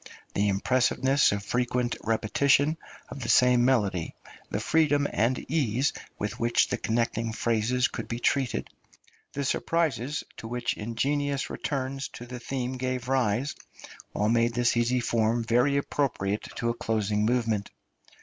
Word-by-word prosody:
The 100 +1 +1
impressiveness 130 +6 +2
of 100 0 -3
frequent 125 +1 0
repetition 135 +7 +2 0.3
of 140 - -7
the 115 - -4
same 125 0 +5
melody, 105 -10 +1 0.3
the - - -2
freedom 145 -3 +2
and 120 +3 +2
ease 135 -3 +1 0.2
with 105 - -4
which 120 0 +2
the 125 - -1
connecting 115 0 -1
phrases 115 +2 +1
could - - -6
be 115 - -3
treated, 130 +1 0 0.7
the 140 0 -2
surprises 145 -3 0
to 115 - -7
which 120 +1 -1
ingenious 140 +5 -1
returns 135 -1 -3
to 120 - -8
the 125 0 -7
theme 130 0 -3
gave 130 -1 -2
rise, 130 +1 +1 0.6
all 105 - +1
made 115 0 +2
this 120 -1 +2
easy 120 +1 +2
form 115 0 +1
very 125 +5 +2
appropriate 110 -8 -1
to 115 - -1
a - - +1
closing 105 -2 -1
movement. 115 -3 0
120 Hz, 140 wpm, -27 LUFS, 115-135 Hz, 0.7 s, same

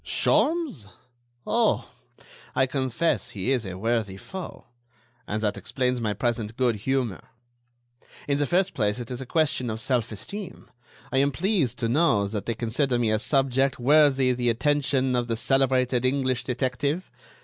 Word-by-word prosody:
"Sholmes? 310 - +1 0.6
Oh! - - +1 0.7
I 130 - +4
confess 130 +4 -1
he 105 +5 -2
is 120 -6 0
a 90 -1 -6
worthy 110 -2 -1
foe; 185 - -8 0.6
and 110 +1 -2
that 105 -2 0
explains 125 -2 -1
my 105 -2 -1
present 115 0 -2
good 125 -3 +2
humor. 125 -2 -1 1.1
In 140 0 +1
the 145 - +1
first 185 +4 +1
place, 105 -2 0
it 120 0 -7
is 125 +1 -4
a 130 - -7
question 130 -5 +1
of 110 0 -3
self 120 -1 0
esteem; 195 - -7 0.4
I 135 - +2
am 140 +1 +3
pleased 160 - 0
to 115 - -1
know 120 -6 +2
that 105 0 -5
they 115 - -1
consider 125 +3 0
me 115 -2 +1
a 110 - +2
subject 135 +1 +1
worthy 135 -1 +4
the 120 -1 0
attention 135 +1 +1
of 120 -1 0
the 115 - -1
celebrated 130 0 +2
English 130 -1 0
detective. 135 +7 -2
125 Hz, 160 wpm, -25 LUFS, 115-140 Hz, 1.1 s, I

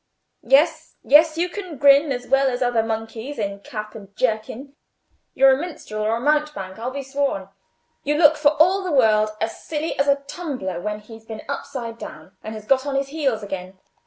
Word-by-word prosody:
"Yes, 315 +3 +2
yes, 310 +3 +5
you 345 +2 +1
can 360 -4 -7
grin 280 +2 +5
as 250 -1 -3
well 270 +1 +3
as 250 0 -1
other 245 -2 +2
monkeys 225 +4 -5
in 200 -2 -3
cap 215 +1 -7
and 200 -2 -12
jerkin. 235 +4 -2 0.6
You're 270 0 +6
a - - +1
minstrel 295 -11 -6
or 220 +1 +1
a - - -3
mountebank, 290 -9 -1
I'll 240 +2 -3
be 275 +1 -5
sworn; 270 -8 -2 0.5
you 295 +1 0
look 310 0 +6
for 295 0 +3
all 375 +4 +4
the 365 - -3
world 215 -6 +4
as 225 0 -4
silly 315 +1 -3
as 280 - +2
a 280 0 +2
tumbler 255 - -4
when 210 +1 -4
he's 220 +1 -13
been 220 -1 -8
upside 245 -5 -5
down 155 +5 -10
and 220 0 -6
has 215 -1 -9
got 270 +3 +2
on 280 - -2
his 275 0 -1
heels 275 -8 -1
again. 190 -1 -6
260 Hz, 195 wpm, -22 LUFS, 215-290 Hz, 0.6 s, You're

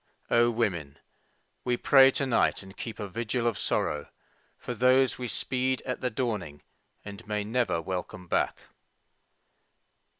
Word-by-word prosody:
O 120 0 +5
women, 95 -12 -2 0.7
we 125 -1 0
pray 135 +1 +7
to 135 +1 -1
night 120 -5 +2
and 95 +1 -13
keep 115 - -6
a 105 - -4
vigil 115 +4 -2
of 115 -3 0
sorrow 75 -1 -1 0.5
For 125 - -5
those 130 +2 +3
we 125 - -3
speed 130 +4 0
at 125 - -3
the 125 - +1
dawning 105 - -3 0.4
and 100 -1 -9
may 105 -1 -1
never 115 -4 0
welcome 90 +2 -5
back! - - 0
115 Hz, 140 wpm, -28 LUFS, 100-125 Hz, 0.7 s, pray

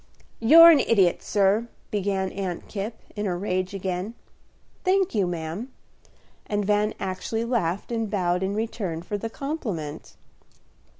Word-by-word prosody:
"You're 330 +9 +9
an 305 - +5
idiot, 190 -6 +3
sir," 205 +3 +2 0.2
began 195 -2 -1
Aunt 185 -3 -4
Kipp, 215 +2 -4 0.2
in 205 -1 -2
a 175 -2 -1
rage 185 0 -2
again. 190 +3 -3 0.7
"Thank 380 0 +2
you, 200 -5 +1
ma'am." 175 +8 -5 0.8
And 205 -1 -1
Van 210 +1 +1
actually 190 +5 -3
laughed 205 -5 -1
and 225 -2 -1
bowed 180 -3 0
in 190 +1 -1
return 200 -7 -3
for 205 +3 -4
the 225 - -4
compliment. 215 - -5
200 Hz, 135 wpm, -25 LUFS, 185-225 Hz, 0.8 s, You're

